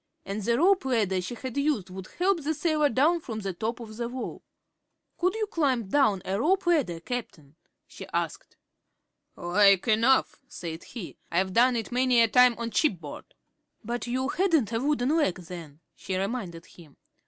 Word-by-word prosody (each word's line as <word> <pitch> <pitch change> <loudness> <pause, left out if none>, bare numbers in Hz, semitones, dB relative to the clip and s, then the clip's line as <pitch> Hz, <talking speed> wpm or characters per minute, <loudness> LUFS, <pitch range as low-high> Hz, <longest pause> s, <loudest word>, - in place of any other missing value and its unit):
And 200 +2 -4
the 235 +3 +1
rope 370 +1 +3
ladder 210 -8 +1
she 185 +7 -6
had 255 0 -7
used 280 -10 0
would 185 0 -8
help 365 -1 +2
the 310 +2 -1
sailor 300 -1 +1
down 300 +8 +3
from 225 -8 -6
the 195 -2 -3
top 225 +7 -3
of 220 -2 -9
the 235 0 -3
wall. 255 0 -6 0.8
"Could 365 +3 +1
you 440 -1 -1
climb 270 - 0
down 210 -8 +2
a 195 +2 -1
rope 370 +9 +2
ladder, 280 - +1
Cap'n?" 165 - -6 0.3
she - - -11
asked. - - -4 0.8
"Like 195 +3 +3
enough," 230 +4 +3
said 165 -1 -7
he. 215 -9 -8
"I've 185 +2 0
done 245 +3 +4
it 230 0 -3
many 250 0 +3
a 230 - +6
time 250 +2 +5
on 235 0 -4
shipboard." 180 - -2 0.5
"But 240 +2 -4
you 260 +3 -1
hadn't 320 - +1
a 225 - +1
wooden 280 +1 +1
leg 295 - +2
then," 165 -4 -10
she 190 - -5
reminded 190 -5 -4
him. 155 -5 -17
235 Hz, 175 wpm, -27 LUFS, 190-280 Hz, 0.8 s, a